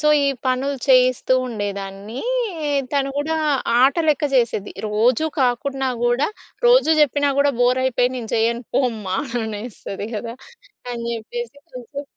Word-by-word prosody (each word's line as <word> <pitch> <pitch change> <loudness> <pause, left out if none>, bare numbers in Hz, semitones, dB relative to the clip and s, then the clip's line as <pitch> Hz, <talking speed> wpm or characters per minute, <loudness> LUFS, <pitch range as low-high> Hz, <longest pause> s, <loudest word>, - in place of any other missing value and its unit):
So, 300 - +2 0.2
ఈ - - +2 0.2
పనులు 265 +2 0
చేయిస్తూ 255 -1 +4
ఉండేదాన్నీ. 205 0 -5 0.7
తను 275 -1 +1
గూడా 315 +2 -1 0.5
ఆటలెక్క 300 +1 +3
చేసేది. 230 -5 +1
రోజూ 230 +8 +2
కాకున్నా 265 +2 0
గూడా, 240 +4 +2 0.4
రోజు 485 -9 +5
చెప్పినా 285 0 +3
గూడా 280 0 +4
బోరయిపోయి, 250 0 +2
నేను 230 -3 -6
చెయ్యను 235 +1 +1
పోమ్మా 220 -8 0 0.3
అనేస్తది 210 -2 -6
కదా! 230 +2 -5 0.6
అని 235 -1 -5
చెప్పేసి 285 - -6 0.2
కొంచెం 255 +3 -7
250 Hz, 120 wpm, -21 LUFS, 225-280 Hz, 0.7 s, రోజు